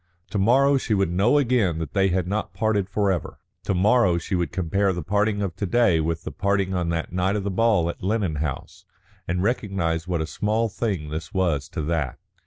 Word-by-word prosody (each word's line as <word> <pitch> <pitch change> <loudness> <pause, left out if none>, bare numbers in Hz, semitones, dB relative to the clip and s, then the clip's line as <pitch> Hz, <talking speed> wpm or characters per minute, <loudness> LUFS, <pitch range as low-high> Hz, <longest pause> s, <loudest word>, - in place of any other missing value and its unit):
To 105 - -1
morrow 135 +7 +4
she 110 - 0
would 95 -3 +1
know 100 +10 +3
again 120 - +2
that 80 -3 -5
they 95 -1 +3
had 90 -1 0
not 100 -1 -3
parted 100 -1 0
forever, 95 -5 -1 0.3
to 100 - 0
morrow 100 -1 +3
she 85 - -5
would 90 -2 0
compare 95 +2 0
the 90 -2 -4
parting 105 +3 +1
of 90 -4 -3
to 100 - -2
day 115 -5 +3
with 80 +1 -2
the - - -5
parting 100 0 0
on 90 -2 -1
the 85 -1 -1
night 90 +3 0
of 105 - -2
the 100 - -2
ball 105 -4 +2
at 85 - -5
Lennon 95 -5 -1
House, 75 -3 -5 0.4
and 90 +2 -1
recognise 95 -7 -1
what 90 -2 -1
a 80 - -1
small 110 +7 -1
thing 95 -8 -3
this 80 +3 -6
was 85 -8 0
to 80 - -4
that. 75 -4 -2
95 Hz, 210 wpm, -24 LUFS, 85-105 Hz, 0.4 s, morrow